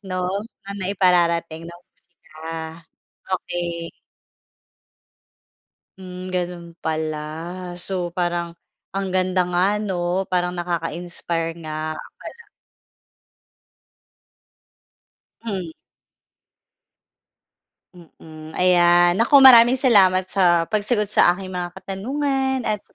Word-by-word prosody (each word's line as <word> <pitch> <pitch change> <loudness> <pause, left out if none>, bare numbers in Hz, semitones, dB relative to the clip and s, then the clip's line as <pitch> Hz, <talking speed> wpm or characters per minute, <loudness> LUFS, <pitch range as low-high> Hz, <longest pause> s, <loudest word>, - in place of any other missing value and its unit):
'no? 185 -2 -4 0.4
Na 200 - -9
naipararating 170 -4 +1
ng 170 0 -12
musika, 160 -1 -10 0.6
okey. 170 -1 -5 2.1
Mm, 185 0 -8
gano'n 175 -1 -4
pala, 155 -1 -3 0.6
so 175 -1 -2
parang, 175 -1 -2 0.4
ang 195 -1 -2
ganda 185 0 +2
nga 185 +4 +1
'no? 180 -2 -1
Parang 180 -1 0
nakaka-inspire 170 -1 -3
nga 155 0 -4 0.2
pala. 470 - -11 3.0
Hmm. 195 -7 -4 2.2
Mm, 160 -2 -14
ayan, 175 0 +4
naku 270 +5 +6
maraming 245 -1 +9
salamat 200 -8 +4
sa 175 -3 +3
pagsagot 210 0 0
sa 175 - +5
aking 190 0 -8
mga 180 -1 -5
katanungan, 265 +5 -2
at 215 -2 -1
sa - - -32
180 Hz, 85 wpm, -22 LUFS, 170-195 Hz, 3.0 s, maraming